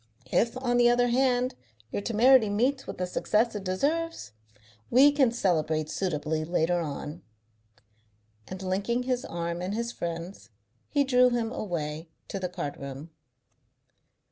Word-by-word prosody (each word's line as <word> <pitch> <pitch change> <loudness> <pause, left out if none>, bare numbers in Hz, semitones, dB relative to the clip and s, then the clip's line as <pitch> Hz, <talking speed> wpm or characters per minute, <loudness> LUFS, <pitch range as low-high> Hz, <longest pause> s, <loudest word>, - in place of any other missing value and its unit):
If, 230 +2 +2
on 245 -2 0
the 240 0 +6
other 245 0 +3
hand, 250 0 +2 0.4
your - - -2
temerity 235 +1 +5
meets 255 +7 0
with - - -6
the 180 - -1
success 215 +5 +1
it 205 -2 -5
deserves, 290 - -1 0.6
we 275 +4 +7
can 275 -5 +3
celebrate 160 -8 0
suitably 155 -4 -1
later 175 +1 +1
on." 150 +1 -5 1.3
And, 185 0 -7
linking 200 +6 -1
his 250 0 -1
arm 170 0 -4
in 185 +2 -3
his 235 +2 -2
friend's, 170 - -6 0.4
he 285 -1 +2
drew 250 -2 +4
him 235 -2 -1
away 160 - -4 0.2
to 195 - -4
the 180 -1 -3
card 170 -5 -5
room. 140 +4 -8
205 Hz, 145 wpm, -28 LUFS, 170-245 Hz, 1.3 s, we